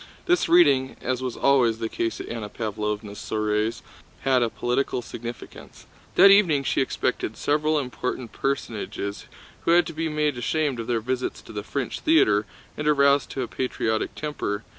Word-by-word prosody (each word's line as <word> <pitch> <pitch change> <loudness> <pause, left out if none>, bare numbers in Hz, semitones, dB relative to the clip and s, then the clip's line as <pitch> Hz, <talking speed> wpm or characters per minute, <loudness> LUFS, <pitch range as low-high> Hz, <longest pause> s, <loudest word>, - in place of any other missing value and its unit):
This 355 0 +2
reading, 140 -7 +5
as 130 0 -2
was 130 -2 -4
always 125 -5 +3
the 115 0 -2
case 115 +1 -3
at - - -6
Anna 115 -3 -5
Pávlovna's 105 -1 -4
soirees, 110 +1 -1 0.4
had 130 -2 +3
a 120 - +2
political 125 +1 -1
significance. 120 +1 -9 0.3
That 195 +2 +8
evening 175 -9 +5
she 135 - +1
expected 125 -4 -2
several 150 +1 +1
important 125 -3 -3
personages 105 -6 -3 0.4
who - - 0
had 175 0 +5
to 165 - -6
be 160 +1 -2
made 150 -4 0
ashamed 145 0 0
of 115 - -5
their 115 -2 0
visits 130 +2 -2
to - - -12
the 105 - -3
French 130 +5 -4
theater 105 - +3 0.3
and 150 - -3
aroused 140 -1 +4
to 130 - -2
a - - -4
patriotic 115 -4 -2
temper. 115 -9 -3
125 Hz, 165 wpm, -25 LUFS, 110-150 Hz, 0.4 s, That